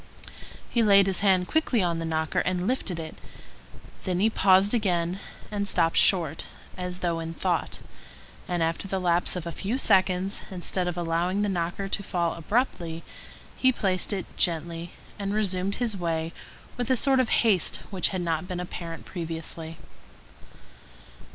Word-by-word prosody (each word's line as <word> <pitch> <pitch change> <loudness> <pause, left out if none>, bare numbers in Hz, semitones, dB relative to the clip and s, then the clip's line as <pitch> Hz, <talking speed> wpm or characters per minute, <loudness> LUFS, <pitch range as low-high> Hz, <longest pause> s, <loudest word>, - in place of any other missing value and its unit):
He 235 - +3
laid 200 -3 +6
his 190 -2 +2
hand 190 -3 +3
quickly 270 -9 +2
on 170 -2 0
the 165 - -3
knocker 160 -1 0
and 180 0 0
lifted 200 -7 -1
it; 160 -1 -6 0.9
then 180 -1 -1
he 220 +3 +3
paused 195 +1 +4
again 180 -5 0 0.3
and 200 -1 -1
stopped 165 -4 +3
short, 165 -5 +3 0.3
as 180 0 -5
though 170 -2 0
in 165 0 -5
thought, - - -1 0.7
and 175 -2 0
after 165 +4 -1
the 190 0 -1
lapse 175 0 +2
of 180 -2 -4
a 170 - -3
few 205 +9 -2
seconds, 190 -4 +2
instead 180 -1 -1
of 175 0 -3
allowing 175 +4 0
the 205 - 0
knocker 175 +1 -2
to 195 - 0
fall 170 -3 -1
abruptly, 170 -3 -1 0.5
he 260 - +4
placed 190 -6 0
it 195 -3 -2
gently, 170 0 0 0.3
and 200 0 -2
resumed 195 -2 0
his 230 -4 -1
way 165 -2 -2 0.4
with 245 0 -2
a 260 - +4
sort 270 +2 +4
of 255 - +2
haste 205 -7 +3 0.2
which 190 -2 +1
had 185 -2 -2
not 165 0 -1
been 180 -1 -4
apparent 170 -2 -6
previously. 165 -2 -5
180 Hz, 160 wpm, -26 LUFS, 170-200 Hz, 0.9 s, laid